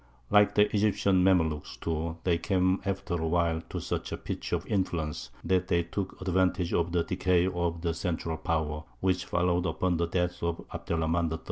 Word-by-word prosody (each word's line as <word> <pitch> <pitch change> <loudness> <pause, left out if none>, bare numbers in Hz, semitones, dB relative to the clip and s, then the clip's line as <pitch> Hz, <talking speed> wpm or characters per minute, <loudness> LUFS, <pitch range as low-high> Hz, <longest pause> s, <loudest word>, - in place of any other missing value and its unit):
Like 105 0 +5
the 105 0 +6
Egyptian 100 -3 +3
Mamlūks, 80 -5 +1
too, 80 0 -2
they 85 -2 +2
came 95 0 +1
after 100 -1 -2
a 80 -1 0
while 85 -1 +1
to - - -3
such - - -3
a - - -2
pitch - - -5
of - - -1
influence 80 -9 -2
that 90 -1 +1
they 85 -2 +2
took 95 +2 -4
advantage 95 -1 +1
of 85 0 +1
the 85 -1 +2
decay 90 0 +2
of 85 -2 -1
the 85 -1 +1
central 80 -1 -2
power, 75 -1 -1 0.2
which 95 -2 +1
followed 90 0 +1
upon 90 -2 0
the 85 0 0
death 90 0 -1
of 85 0 -2
Abd - - -7
er - - +2
Rahmān 80 +1 +1
III. 80 - -3
85 Hz, 195 wpm, -29 LUFS, 85-95 Hz, 0.2 s, the